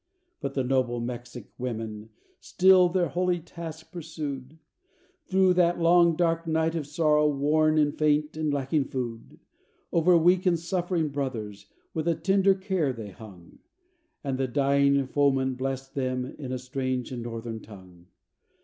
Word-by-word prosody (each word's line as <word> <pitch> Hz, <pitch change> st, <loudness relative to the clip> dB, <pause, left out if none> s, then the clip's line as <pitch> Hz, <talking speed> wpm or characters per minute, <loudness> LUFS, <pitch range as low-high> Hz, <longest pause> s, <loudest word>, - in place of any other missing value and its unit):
But -, -, -5 dB
the 135 Hz, -, +1 dB
noble 125 Hz, -2 st, 0 dB
Mexic 120 Hz, -1 st, -7 dB
women 110 Hz, -3 st, -5 dB, 0.3 s
still 185 Hz, -1 st, +5 dB
their 175 Hz, -1 st, 0 dB
holy 180 Hz, 0 st, 0 dB
task 160 Hz, -1 st, -9 dB
pursued, 155 Hz, -5 st, -6 dB, 0.7 s
Through 190 Hz, -1 st, +4 dB
that 175 Hz, -1 st, +2 dB
long 170 Hz, 0 st, +5 dB
dark 165 Hz, 0 st, 0 dB
night 160 Hz, 0 st, +1 dB
of 160 Hz, -4 st, -3 dB
sorrow 150 Hz, -1 st, +3 dB
worn 155 Hz, +2 st, +2 dB
and 145 Hz, -1 st, +2 dB
faint 150 Hz, 0 st, +1 dB
and 155 Hz, -1 st, -1 dB
lacking 140 Hz, +1 st, 0 dB
food; 120 Hz, -4 st, -6 dB, 0.5 s
Over 170 Hz, +1 st, +5 dB
weak 180 Hz, +3 st, +3 dB
and 175 Hz, -2 st, +3 dB
suffering 175 Hz, -2 st, -1 dB
brothers, 110 Hz, -8 st, -5 dB, 0.3 s
with 160 Hz, 0 st, -2 dB
a 170 Hz, -, +2 dB
tender 195 Hz, +1 st, +3 dB
care 190 Hz, -6 st, -1 dB
they 110 Hz, -5 st, -8 dB
hung, 95 Hz, -5 st, -14 dB, 0.6 s
And 135 Hz, -2 st, -2 dB
the 135 Hz, -, +1 dB
dying 140 Hz, +1 st, +2 dB
foeman 135 Hz, -1 st, +1 dB
bless'd 135 Hz, +1 st, -4 dB
them 130 Hz, -2 st, -2 dB
in 130 Hz, 0 st, -8 dB
a 130 Hz, -, -1 dB
strange 130 Hz, -1 st, -3 dB
and 125 Hz, -2 st, -5 dB
Northern 115 Hz, -1 st, -5 dB
tongue. 90 Hz, -5 st, -15 dB
145 Hz, 150 wpm, -27 LUFS, 125-165 Hz, 0.7 s, still